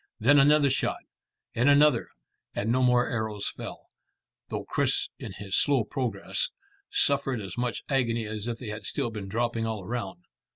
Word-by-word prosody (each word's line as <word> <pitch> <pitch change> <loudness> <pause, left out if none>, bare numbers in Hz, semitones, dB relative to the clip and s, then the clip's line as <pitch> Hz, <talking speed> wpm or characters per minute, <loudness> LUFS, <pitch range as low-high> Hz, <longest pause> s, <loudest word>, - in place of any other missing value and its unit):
Then 140 +6 +6
another 145 0 +5
shot, - - -1 0.5
and 125 +3 +3
another, 145 -4 +5 0.5
and 110 +3 0
no 130 +2 +2
more 125 -1 +4
arrows 110 -3 -2
fell, - - -9 0.6
though - - -3
Chris - - 0
in - - -7
his 100 0 -4
slow 140 -5 +3
progress 125 - -2 0.4
suffered 135 -3 +1
as 95 -3 -6
much 120 -1 -2
agony 115 -4 +1
as 110 +1 -5
if 115 -1 -2
they 120 -3 -7
had 105 0 -6
still 120 - -2
been 105 -3 -6
dropping 115 +1 0
all 110 -3 -3
around. 95 -4 -5
120 Hz, 165 wpm, -28 LUFS, 110-130 Hz, 0.6 s, Then